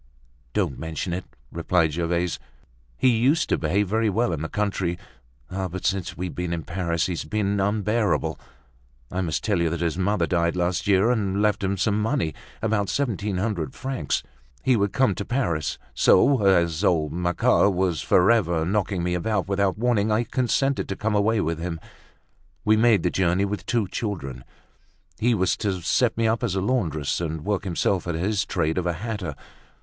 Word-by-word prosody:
"Don't -, -, -1 dB
mention 80 Hz, +2 st, -4 dB
it!" 90 Hz, +1 st, -4 dB, 0.3 s
replied 85 Hz, -1 st, +1 dB
Gervaise. 85 Hz, +1 st, -1 dB, 0.6 s
"He 130 Hz, -, +4 dB
used 130 Hz, +7 st, +2 dB
to -, -, +2 dB
behave 95 Hz, +6 st, +1 dB
very 110 Hz, +3 st, +1 dB
well 105 Hz, -2 st, +1 dB
in 75 Hz, -, -3 dB
the 80 Hz, -, -3 dB
country; 95 Hz, -4 st, -1 dB, 0.5 s
but, 95 Hz, -1 st, -4 dB
since 95 Hz, -2 st, -1 dB
we've 90 Hz, 0 st, -4 dB
been 90 Hz, -1 st, -3 dB
in 85 Hz, -2 st, -3 dB
Paris, 85 Hz, -2 st, -1 dB
he's 90 Hz, -3 st, -2 dB
been 100 Hz, +5 st, -1 dB
unbearable. 105 Hz, +2 st, 0 dB, 0.7 s
I 95 Hz, -, -1 dB
must 85 Hz, -4 st, -2 dB
tell 100 Hz, -6 st, +1 dB
you 85 Hz, -, +2 dB
that 85 Hz, +1 st, -3 dB
his 85 Hz, +1 st, -1 dB
mother 95 Hz, -2 st, +1 dB
died 85 Hz, 0 st, +1 dB
last 90 Hz, +1 st, -1 dB
year 100 Hz, +4 st, +4 dB
and 100 Hz, -5 st, 0 dB
left 105 Hz, -1 st, +1 dB
him 100 Hz, +1 st, 0 dB
some 105 Hz, +2 st, +1 dB
money—about 105 Hz, +2 st, -2 dB
seventeen 105 Hz, -8 st, -1 dB
hundred 90 Hz, -, -2 dB
francs. 130 Hz, -, -2 dB, 0.4 s
He 130 Hz, -, +4 dB
would 100 Hz, -3 st, +1 dB
come 130 Hz, -6 st, +2 dB
to 100 Hz, -, -4 dB
Paris, 85 Hz, -, -1 dB, 0.2 s
so, 110 Hz, +1 st, +4 dB
as 85 Hz, -2 st, +3 dB
old 80 Hz, -6 st, +2 dB
Macquart 90 Hz, +3 st, +2 dB
was 90 Hz, -3 st, 0 dB
forever 90 Hz, -5 st, +3 dB
knocking 95 Hz, -1 st, 0 dB
me 90 Hz, 0 st, 0 dB
about 95 Hz, +1 st, -1 dB
without 100 Hz, -1 st, +1 dB
warning, 110 Hz, -2 st, +1 dB
I 110 Hz, +2 st, +2 dB
consented 130 Hz, +3 st, 0 dB
to 95 Hz, -, -2 dB
come 110 Hz, +2 st, -1 dB
away 105 Hz, +1 st, +2 dB
with 80 Hz, 0 st, -2 dB
him. 85 Hz, -1 st, -4 dB, 0.9 s
We 110 Hz, -, +5 dB
made 110 Hz, -5 st, +4 dB
the 90 Hz, -, +1 dB
journey 95 Hz, +1 st, +2 dB
with 100 Hz, +1 st, -5 dB
two 115 Hz, -5 st, +1 dB
children. 70 Hz, -, -4 dB, 0.7 s
He 120 Hz, +1 st, +3 dB
was 95 Hz, -2 st, +1 dB
to 95 Hz, -4 st, -2 dB
set 120 Hz, +5 st, +2 dB
me 115 Hz, -1 st, +2 dB
up 115 Hz, +2 st, 0 dB
as 105 Hz, -6 st, 0 dB
a -, -, +1 dB
laundress, 85 Hz, -, -1 dB
and 80 Hz, -1 st, -4 dB
work 100 Hz, -1 st, -1 dB
himself 90 Hz, 0 st, 0 dB
at 85 Hz, -, -1 dB
his 100 Hz, +4 st, 0 dB
trade 80 Hz, +3 st, 0 dB
of 90 Hz, -, -2 dB
a 85 Hz, -, +1 dB
hatter. 95 Hz, -4 st, -4 dB
95 Hz, 180 wpm, -24 LUFS, 85-105 Hz, 0.9 s, We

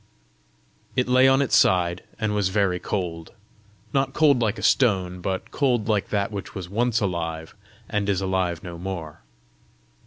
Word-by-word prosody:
It 125 Hz, -1 st, +1 dB
lay 130 Hz, +1 st, +5 dB
on 135 Hz, +1 st, +4 dB
its 135 Hz, -, +1 dB
side, 90 Hz, -1 st, +3 dB, 0.2 s
and 110 Hz, -2 st, -1 dB
was 100 Hz, -3 st, +1 dB
very 95 Hz, -2 st, +1 dB
cold 85 Hz, -5 st, -4 dB, 0.6 s
not 135 Hz, -1 st, +1 dB
cold 145 Hz, -4 st, +4 dB
like 110 Hz, -1 st, 0 dB
a -, -, -7 dB
stone, 95 Hz, -7 st, +2 dB
but 95 Hz, +1 st, -3 dB
cold 125 Hz, -6 st, +1 dB
like 105 Hz, -3 st, 0 dB
that 100 Hz, 0 st, -1 dB
which 100 Hz, -2 st, -7 dB
was 95 Hz, -3 st, -5 dB
once 120 Hz, +4 st, 0 dB
alive, 80 Hz, -4 st, -3 dB, 0.3 s
and 105 Hz, -1 st, -1 dB
is 95 Hz, -3 st, +1 dB
alive 95 Hz, -3 st, -1 dB
no 85 Hz, -1 st, -8 dB
more. 85 Hz, -5 st, -6 dB
100 Hz, 160 wpm, -24 LUFS, 90-115 Hz, 0.6 s, lay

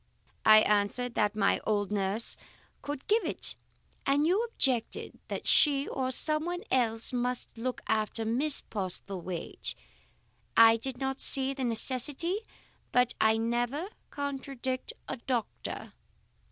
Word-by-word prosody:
I 215 Hz, 0 st, +9 dB
answered 210 Hz, +4 st, +1 dB
that 210 Hz, -1 st, +1 dB
my 200 Hz, -2 st, +2 dB
old 205 Hz, -2 st, 0 dB
nurse 205 Hz, +2 st, +1 dB, 0.5 s
could 285 Hz, -2 st, -6 dB
give 435 Hz, +1 st, +3 dB
it, 330 Hz, -, -1 dB, 0.5 s
and 285 Hz, +2 st, +2 dB
you 380 Hz, +7 st, +2 dB
objected 260 Hz, -, -1 dB
that -, -, -5 dB
she 280 Hz, -2 st, +4 dB
or 260 Hz, -1 st, -2 dB
someone 310 Hz, +6 st, 0 dB
else 230 Hz, -2 st, +1 dB
must 250 Hz, 0 st, -2 dB
look 250 Hz, +2 st, -4 dB
after 220 Hz, +1 st, 0 dB
Miss 270 Hz, +6 st, +2 dB
Postlethwaite. 185 Hz, -3 st, -4 dB, 0.8 s
I 225 Hz, 0 st, +8 dB
did 255 Hz, +2 st, -6 dB
not 265 Hz, +1 st, -3 dB
see 270 Hz, 0 st, +4 dB
the 265 Hz, -2 st, -3 dB
necessity, 265 Hz, -, +1 dB, 0.5 s
but 250 Hz, -1 st, +3 dB
I 220 Hz, 0 st, +4 dB
never 240 Hz, -, -1 dB, 0.2 s
contradict 270 Hz, -2 st, -4 dB, 0.2 s
a 265 Hz, -, -4 dB
doctor. 240 Hz, -1 st, -4 dB
250 Hz, 125 wpm, -30 LUFS, 220-275 Hz, 0.8 s, I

